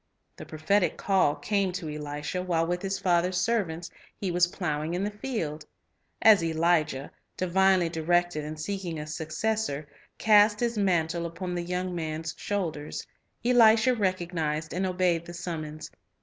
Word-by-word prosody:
The - - -10
prophetic 175 +5 +1
call 190 -7 +2
came 195 +5 0
to 175 -3 -4
Elisha 150 +3 -4
while 170 -3 +1
with 175 +1 -2
his 195 0 -2
father's 180 0 +1
servants 175 -6 -1 0.3
he 190 -3 -2
was 175 0 +3
plowing 160 -2 -2
in 185 - -1
the 205 - -1
field. 205 - -4 0.6
As 215 -5 +7
Elijah, 160 -4 +1 0.3
divinely 185 0 +3
directed 170 0 0
in 155 +1 -6
seeking 175 0 -4
a 150 - -5
successor, 155 0 -2 0.3
cast 210 -1 +5
his 235 -1 0
mantle 170 -4 +1
upon 180 +2 -5
the 175 - -2
young 180 +1 -3
man's 160 -1 -3
shoulders, 165 -8 -3 0.4
Elisha 235 0 +6
recognized 175 -7 -1
and 185 +2 0
obeyed 180 -2 +1
the 175 - -8
summons. 155 -3 -6
175 Hz, 145 wpm, -27 LUFS, 160-195 Hz, 0.6 s, As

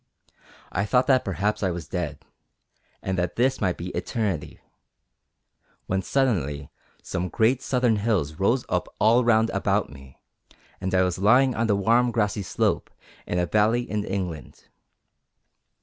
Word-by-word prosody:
I 100 - 0
thought 125 +4 +2
that 130 -2 +3
perhaps 100 +2 -1
I 95 - +1
was 85 -4 -5
dead, 75 -5 -4 0.8
and 95 -1 -1
that 90 -1 -2
this 130 +2 +1
might 90 -3 0
be 90 +2 -5
eternity; 95 -8 -3 1.3
when 95 0 -1
suddenly 80 - -1 0.3
some 90 0 -3
great 115 +9 +2
southern 125 -4 +1
hills 100 -9 0
rose 115 +6 +2
up 90 -1 -1
all 115 +4 +4
round 115 -1 +3
about - - 0
me, 70 -1 -14 0.6
and 95 0 -1
I 95 - +4
was 90 -1 -1
lying 125 +6 +4
on 115 0 0
the 105 - +3
warm, 115 +5 +3
grassy 105 -3 0
slope 95 - -1 0.4
of 90 - -1
a 90 - +2
valley 110 +6 +2
in 105 -3 -3
England. 90 -9 -5
100 Hz, 150 wpm, -25 LUFS, 90-115 Hz, 1.3 s, all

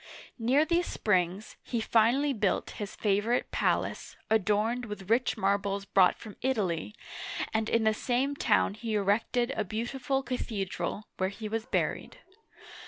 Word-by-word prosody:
Near 260 +7 +3
these 345 +1 +1
springs, 185 0 0
he 235 - -3
finally 235 +6 +3
built 210 -5 0
his 205 - -5
favorite 210 +4 +1
palace, - - -1
adorned 220 +3 +2
with 210 -2 -7
rich 245 +2 +2
marbles 200 0 0
brought 190 -2 +4
from 215 -3 -11
Italy, 210 -7 -1 0.6
and 220 0 0
in 230 -1 +2
the 220 0 +4
same 255 +5 0
town 240 - +2
he 220 +1 -3
erected 225 +5 +1
a 215 - 0
beautiful 250 +6 -2
cathedral, 205 -6 -3
where 185 0 +1
he 215 +2 -6
was 225 +1 -3
buried. - - -1
220 Hz, 140 wpm, -29 LUFS, 200-245 Hz, 0.6 s, brought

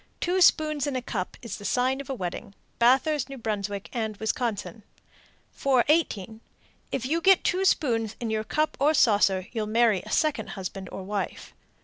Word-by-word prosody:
Two 365 +1 0
spoons 305 -4 +3
in 280 - -2
a 255 - -1
cup 185 -6 -4
is 230 - -5
the - - -11
sign 255 +5 +1
of 280 - -12
a 270 - -2
wedding. 195 +1 -6 0.2
Bathurst, 265 +3 +3
N.B., 210 -6 -3
and 220 -4 -3
Wisconsin. 220 0 -3 0.7
418. 250 - +1 0.5
If 260 -2 -2
you 325 +5 0
get 385 +1 +5
two 370 +1 +1
spoons 225 - +1
in 230 -2 -3
your 215 0 -1
cup 305 +7 -1
or 300 +3 +3
saucer, 200 -6 +3
you'll 220 -3 -3
marry 220 -3 +3
a - - -12
second 280 -9 +1
husband 190 0 -6
or 190 - -6
wife. 200 +1 -4
235 Hz, 165 wpm, -26 LUFS, 210-280 Hz, 0.7 s, get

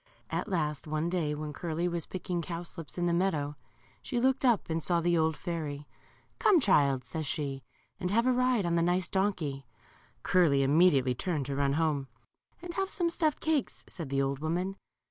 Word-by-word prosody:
At - - -2
last 155 -5 -1
one 155 +3 -1
day, 160 -5 0
when 150 0 -5
Curly 170 +2 -2
was 170 -2 -2
picking 180 -1 -3
cow 170 +1 -5
slips 165 -4 -7
in 175 - 0
the 170 - +2
meadow, 155 -5 0 0.5
she 245 -3 -2
looked 265 +2 +2
up 240 -6 +3
and 165 0 -1
saw 170 +4 +2
the 175 +1 +2
old 160 -1 +2
fairy. 150 -5 -4 0.5
Come, 390 -5 +5
child," 140 - +3
says 160 -3 -4
she, 140 -3 -3 0.4
and 180 - -2
have 230 +5 +2
a 255 - +4
ride 250 -4 +2
on 170 - 0
the 170 - +3
nice 175 +1 +2
donkey." 160 -9 -1 0.6
Curly 155 -7 +4
immediately 140 -3 +4
turned 150 +2 -2
to 140 +1 -3
run 140 0 +1
home. 150 -3 0 0.6
And 350 -1 -6
have 385 +2 -1
some 345 -4 0
stuffed 310 -3 0
cakes," 310 -5 -1
said 165 -6 -7
the 135 0 +1
old 135 0 -1
woman. 175 +5 -1
170 Hz, 190 wpm, -30 LUFS, 145-185 Hz, 0.6 s, Come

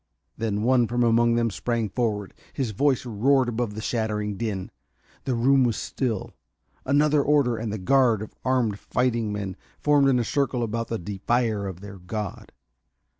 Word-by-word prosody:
Then 110 -2 -2
one 125 -1 +3
from 120 +1 0
among 115 0 +3
them 115 -1 +1
sprang 115 +2 -1
forward. 105 -2 -2 0.2
His 130 -6 -2
voice 130 +4 +1
roared 125 +4 +2
above 115 -3 -2
the 110 - -5
shattering 105 -3 -1
din. 100 -3 -4 0.5
The 130 - 0
room 130 +3 +4
was 120 -3 +1
still. 115 -7 -3 0.5
Another 145 +2 +3
order, 140 -4 +2
and 110 -1 -4
the 110 - -3
guard 115 +1 +3
of 110 - -10
armed 120 -6 +1
fighting 120 -3 0
men 100 -3 -4 0.2
formed 145 -2 +4
in 130 - +3
a 120 - +1
circle 130 -1 0
about 115 +1 -2
the 115 - -2
defier 105 +2 -1
of 95 -1 -7
their 100 -1 -9
god. 100 +2 -6
115 Hz, 170 wpm, -25 LUFS, 105-125 Hz, 0.5 s, room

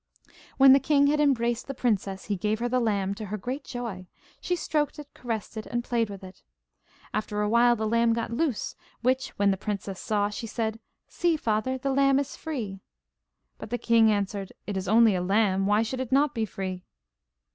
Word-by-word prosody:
When 270 -1 +8
the 275 - +6
king 285 0 +3
had 295 +1 +2
embraced 240 -5 +1
the 275 - -5
princess, 200 -6 -1
he 205 - -1
gave 210 +3 -1
her 240 +2 -1
the 255 +1 +1
lamb, 200 -4 0
to 215 +1 -7
her 210 +2 -3
great 255 +8 -5
joy. 230 -9 -6 0.3
She 360 - -1
stroked 305 -3 -1
it, 295 -1 -11
caressed 225 -2 -5
it, 215 - -5
and 240 0 -2
played 230 -3 0
with 195 -1 -9
it. 185 0 -12 0.7
After 210 0 -1
a - - +1
while 240 +2 +4
the 220 -1 -2
lamb 230 +1 +3
got 230 0 -3
loose, 265 -1 -1 0.3
which, 255 +2 +1
when 200 0 +3
the 195 - -1
princess 200 -2 -4
saw, 205 -1 0
she 225 +2 -5
said: 220 0 -3 0.3
'See, 340 -2 0
father, 235 +1 0
the 270 +1 -1
lamb 275 0 +4
is 280 0 -2
free.' 230 - -5 0.8
But - - -8
the 245 - -1
king 230 -2 +4
answered: 200 -1 -2
'It 205 - -4
is 190 0 -3
only 220 +1 +5
a 180 - 0
lamb, 195 0 +2
why 210 +2 +3
should 255 +3 -4
it 260 -1 -4
not 280 +1 +3
be 225 -1 -1
free? 185 -2 -5
225 Hz, 205 wpm, -27 LUFS, 205-260 Hz, 0.8 s, When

